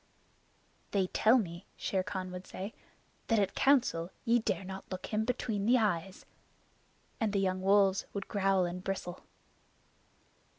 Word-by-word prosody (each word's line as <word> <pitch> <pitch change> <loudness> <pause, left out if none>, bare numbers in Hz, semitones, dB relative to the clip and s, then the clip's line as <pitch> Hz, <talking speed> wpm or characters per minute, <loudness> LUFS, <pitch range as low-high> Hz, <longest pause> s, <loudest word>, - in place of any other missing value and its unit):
"They 195 -2 +1
tell 220 +6 +4
me," 175 -5 -4
Shere 190 - 0
Khan 185 0 -4
would 180 +1 -8
say, 195 +4 -6 0.5
"that 225 - +3
at 200 -2 +1
Council 245 -12 +3 0.2
ye 235 +1 +4
dare 220 - -1
not 190 +1 -7
look 185 0 -4
him 215 +1 +1
between 225 -4 -1
the 250 +2 +6
eyes." 195 -4 -1 0.9
And 220 -4 0
the 200 - +2
young 185 -1 0
wolves 195 0 +3
would 200 -1 -5
growl 195 -2 +2
and 180 +1 -5
bristle. 185 -2 -4
195 Hz, 145 wpm, -32 LUFS, 185-215 Hz, 0.9 s, the